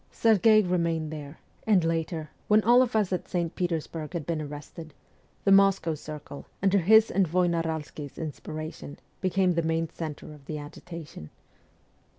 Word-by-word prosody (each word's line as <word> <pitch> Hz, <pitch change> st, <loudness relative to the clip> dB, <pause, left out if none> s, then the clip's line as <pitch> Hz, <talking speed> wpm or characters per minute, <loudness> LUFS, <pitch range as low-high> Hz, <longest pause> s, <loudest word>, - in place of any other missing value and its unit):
Serghei 215 Hz, -1 st, +5 dB
remained 165 Hz, -3 st, 0 dB
there, 145 Hz, 0 st, -8 dB, 0.3 s
and 200 Hz, -5 st, +4 dB
later, 165 Hz, -1 st, -2 dB, 0.2 s
when 215 Hz, 0 st, +4 dB
all 240 Hz, +3 st, +6 dB
of 250 Hz, -3 st, 0 dB
us 205 Hz, -4 st, +2 dB
at 180 Hz, -, -3 dB
St. 170 Hz, -2 st, -2 dB
Peters 170 Hz, -4 st, -1 dB
burg 160 Hz, 0 st, -7 dB
had 165 Hz, -5 st, -3 dB
been 165 Hz, -2 st, -2 dB
arrested, 150 Hz, +1 st, -9 dB, 0.5 s
the 195 Hz, -, +3 dB
Moscow 195 Hz, -4 st, +4 dB
circle, 150 Hz, -1 st, -9 dB, 0.2 s
under 195 Hz, 0 st, +4 dB
his 220 Hz, +5 st, +5 dB
inspiration, 160 Hz, -4 st, -2 dB, 0.2 s
became 185 Hz, 0 st, +2 dB
the 170 Hz, -1 st, +1 dB
main 165 Hz, 0 st, 0 dB
centre 155 Hz, -1 st, -7 dB
of 145 Hz, -2 st, -16 dB
the 155 Hz, -, -4 dB
agitation. 150 Hz, -, -9 dB
165 Hz, 145 wpm, -27 LUFS, 155-185 Hz, 0.5 s, all